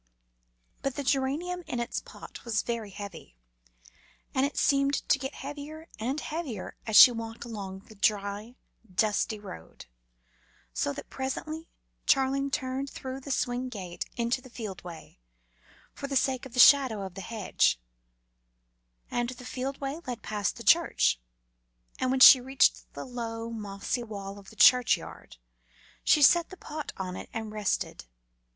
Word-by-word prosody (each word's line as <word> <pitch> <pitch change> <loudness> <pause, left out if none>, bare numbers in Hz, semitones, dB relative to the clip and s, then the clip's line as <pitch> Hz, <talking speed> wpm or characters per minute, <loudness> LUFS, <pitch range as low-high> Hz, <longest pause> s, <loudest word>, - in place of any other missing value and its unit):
But 275 -1 -2
the 285 - -3
geranium 285 +7 0
in 245 - -3
its 235 - -2
pot - - -12
was 230 -3 0
very 230 -3 -3
heavy 200 - -9 1.0
and 265 +1 +2
it 285 - -10
seemed 275 0 +3
to 285 - +4
get 270 0 -5
heavier 295 +3 -8
and 260 +7 -1
heavier 295 - -5
as 220 - -1
she 250 - +11
walked 225 0 -6
along 195 -4 -6
the 220 - -16
dry, 205 +2 -1 0.4
dusty 215 +3 +1
road, 195 - -11 0.9
so 140 - 0
that - - -9
presently 310 +5 -4 0.4
Charling 275 0 +2
turned 265 +1 -2
through 260 0 -6
the 270 - -10
swing 250 -1 -1
gate 185 -7 -6
into 235 +2 0
the 255 - -14
field 215 -6 -7
way, 170 - -11 0.7
for 280 - -6
the 275 - -3
sake 260 -1 +1
of 250 - -14
the - - -1
shadow 255 -6 +7
of 190 - -8
the 195 - -7
hedge; 210 - +1 1.3
and 240 0 0
the 250 -1 -9
field 265 +2 -4
way 280 +4 -4
led 245 -2 -5
past 205 -4 -2
the - - -9
church, - - +4 0.8
and 255 - 0
when 260 0 +1
she 260 -1 +11
reached 265 +2 +2
the - - -6
low, 230 -2 -5
mossy 210 +2 -3
wall 200 -3 -7
of 195 - -14
the 220 - -15
churchyard, 245 - +3 0.7
she 300 - +5
set 340 +4 +6
the 375 - -11
pot 305 -2 -6
on 185 -1 -4
it - - -8
and 220 -1 -4
rested. 210 - -2
245 Hz, 155 wpm, -28 LUFS, 210-270 Hz, 1.3 s, she